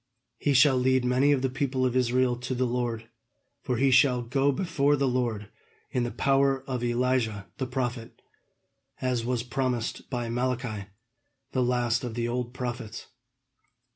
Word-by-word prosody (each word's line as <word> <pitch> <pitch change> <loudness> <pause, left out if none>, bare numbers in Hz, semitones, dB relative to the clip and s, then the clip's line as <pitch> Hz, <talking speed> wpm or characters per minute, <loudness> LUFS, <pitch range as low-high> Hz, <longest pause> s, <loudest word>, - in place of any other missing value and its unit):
He 145 -2 +1
shall 135 0 +6
lead 130 0 +2
many 130 +3 +3
of 135 -2 +2
the 130 - +2
people 130 -1 0
of 125 -1 0
Israel 125 0 +2
to 125 +1 -4
the 130 +1 +1
Lord, 120 -2 -2 0.5
for 125 - -1
he 135 +1 +3
shall 130 -1 +4
go 135 +4 +2
before 145 -2 +1
the 140 -1 +1
Lord 120 -5 -1 0.4
in 125 - 0
the - - -2
power 135 +1 +2
of 125 -3 -3
Elijah 120 -4 0
the 130 - -1
prophet, 125 -2 -4 0.8
as 125 -2 0
was 120 -1 -1
promised 125 -2 -2
by 120 -3 -2
Malachi, 120 -4 -2 0.6
the 130 - 0
last 120 -1 +1
of 120 -3 -4
the 120 -1 -1
old 120 0 -2
prophets. 120 -3 -6
125 Hz, 160 wpm, -27 LUFS, 120-130 Hz, 0.8 s, shall